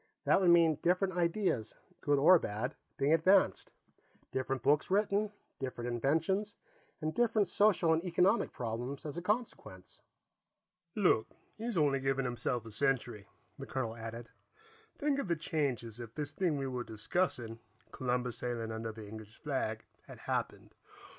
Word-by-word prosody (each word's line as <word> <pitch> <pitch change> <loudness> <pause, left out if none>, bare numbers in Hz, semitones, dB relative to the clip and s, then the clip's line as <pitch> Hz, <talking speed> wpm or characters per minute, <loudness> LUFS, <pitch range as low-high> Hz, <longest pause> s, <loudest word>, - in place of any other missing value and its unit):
That - - +4
would 180 - +4
mean 165 -3 +5
different 185 +2 +2
ideas, 170 - 0 0.3
good 145 -1 +2
or 165 +6 +7
bad, 110 +2 -3 0.2
being 140 +3 +3
advanced; 185 +4 +4 0.6
different 130 0 -2
books 145 +2 +3
written; 205 +1 +2 0.3
different 125 -2 -4
inventions, 165 - 0 0.5
and 155 0 -1
different 225 -4 +2
social 185 -4 +3
and 160 +1 0
economic 180 +5 +2
problems 120 +4 -4
as 150 - -5
a 175 - -3
consequence." 195 - -4 0.9
"Look, 180 - +3 0.3
he's 230 -2 -3
only 145 -3 +3
giving 135 0 0
himself 120 -1 -2
a 115 - -9
century," 120 -3 0 0.3
the - - -7
colonel 115 -4 -3
added. 115 +1 -7 0.7
"Think 285 -1 +1
of 275 - -2
the 170 - +1
changes 135 -8 -2
if 115 -1 -9
this 145 -1 -3
thing 160 -1 0
we 135 - -2
were 125 -2 -3
discussing, 115 - -2 0.3
Columbus 125 -2 -1
sailing 115 -2 -3
under 110 0 -4
the 110 -1 -10
English 110 0 -10
flag, 130 -7 -2 0.2
had - - -10
happened. - - -3
140 Hz, 145 wpm, -33 LUFS, 120-180 Hz, 0.9 s, or